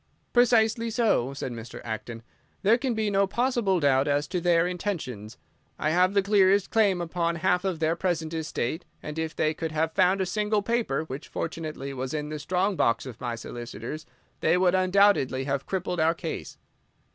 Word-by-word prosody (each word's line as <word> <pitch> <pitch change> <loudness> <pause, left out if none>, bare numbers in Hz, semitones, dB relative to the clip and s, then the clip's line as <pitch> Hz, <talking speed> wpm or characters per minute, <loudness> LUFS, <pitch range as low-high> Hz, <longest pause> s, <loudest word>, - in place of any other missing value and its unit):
"Precisely 230 -1 +3
so," 220 - +1
said 135 -2 -5
Mr. 115 0 -8
Acton. 115 +1 -6 0.4
"There 220 +5 +4
can 255 -2 -1
be 215 -1 0
no 195 0 +3
possible 235 -4 +1
doubt 140 -2 +3
as 145 0 +1
to 180 -2 -2
their 170 -1 +3
intentions. 155 - -4 0.4
I 155 - 0
have 185 +3 +3
the 200 - +4
clearest 200 -1 +3
claim 200 -5 +3
upon 170 0 -1
half 180 +1 +1
of 190 -3 -1
their 160 +1 +1
present 170 -3 -2
estate, 160 -1 -3 0.2
and 150 +1 -5
if 160 0 -3
they 155 0 +1
could 160 0 -4
have 160 +1 0
found 185 +1 +3
a 190 - +1
single 210 +2 0
paper—which, 160 - -2
fortunately, 155 -4 -5
was 130 +2 -4
in 150 0 -3
the 155 0 -5
strong 185 +6 0
box 115 -7 +1
of 125 -4 -9
my 120 -2 -2
solicitors—they 120 - -4
would 180 -1 +3
undoubtedly 185 -8 +3
have 135 0 -2
crippled 180 -2 -2
our 160 +1 +3
case." 165 -1 -6
170 Hz, 175 wpm, -27 LUFS, 145-195 Hz, 0.4 s, There